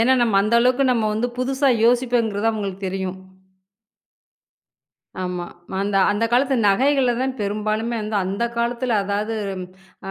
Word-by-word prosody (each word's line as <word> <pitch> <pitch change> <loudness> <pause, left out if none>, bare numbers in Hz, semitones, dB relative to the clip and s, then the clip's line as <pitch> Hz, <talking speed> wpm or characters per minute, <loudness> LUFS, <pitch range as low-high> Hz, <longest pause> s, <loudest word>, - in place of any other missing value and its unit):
ஏன்னா 240 +3 +4
நம்ம 225 -4 +2
அந்த 215 +3 0
அளவுக்கு 255 +2 +3
நம்ம 225 -3 0
வந்து 220 +3 0
புதுசா 270 +2 +1 0.2
யோசிப்பேங்கிறது 235 -3 +2
அவுங்களுக்கு 200 -3 -4
தெரியும். 190 0 -4 2.0
ஆமா. 180 -1 -3 0.4
அந்த 200 0 -1
அந்தக் 225 +2 0
காலத்து 265 +2 +3
நகைகள 260 +5 +3
தான் 265 0 -1
பெரும்பாலுமே 215 +3 -2 0.3
அந்த 195 +5 -2
காலத்துல. 235 +1 -1
அதாவது 205 +3 -2 0.7
அ - - -3
225 Hz, 125 wpm, -21 LUFS, 200-245 Hz, 2.0 s, ஏன்னா